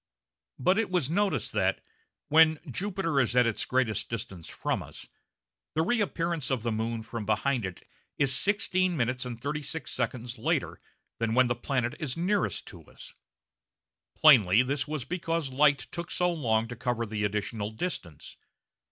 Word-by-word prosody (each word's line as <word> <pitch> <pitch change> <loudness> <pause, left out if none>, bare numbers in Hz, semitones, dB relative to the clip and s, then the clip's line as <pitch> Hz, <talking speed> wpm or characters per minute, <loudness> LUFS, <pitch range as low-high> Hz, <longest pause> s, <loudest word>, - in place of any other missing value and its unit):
But 185 - +2
it 225 - 0
was 175 -6 0
noticed 180 - 0
that, - - +1 0.5
when 160 +1 +6
Jupiter 180 - -1
is 125 -2 +1
at 125 -1 +5
its 115 -2 -1
greatest 115 -5 0
distance 95 -7 -6
from - - -2
us, - - -11 0.7
the 160 - +3
reappearance 170 - 0
of 130 -5 -1
the 120 - 0
moon 110 +1 -2
from 115 0 -5
behind 110 +2 0
it 90 - -11 0.3
is 135 -2 +4
16 185 -3 +1
minutes 125 0 0
and 120 -2 -6
36 150 +4 -4
seconds 125 -1 -3
later - - -1 0.4
than 115 0 0
when 130 0 +6
the 120 - +1
planet 120 0 -1
is 140 -3 -3
nearest 190 +3 0
to - - -12
us. - - -13 1.0
Plainly 120 -8 +6
this 135 +1 -1
was 150 -4 -4
because 165 -3 -2
light 145 +1 +5
took 170 0 -5
so 180 0 +1
long 115 -8 +1
to 120 - -6
cover 120 -1 -1
the 105 -1 -3
additional 105 +1 -2
distance. 110 - -6
130 Hz, 160 wpm, -28 LUFS, 115-165 Hz, 1.0 s, when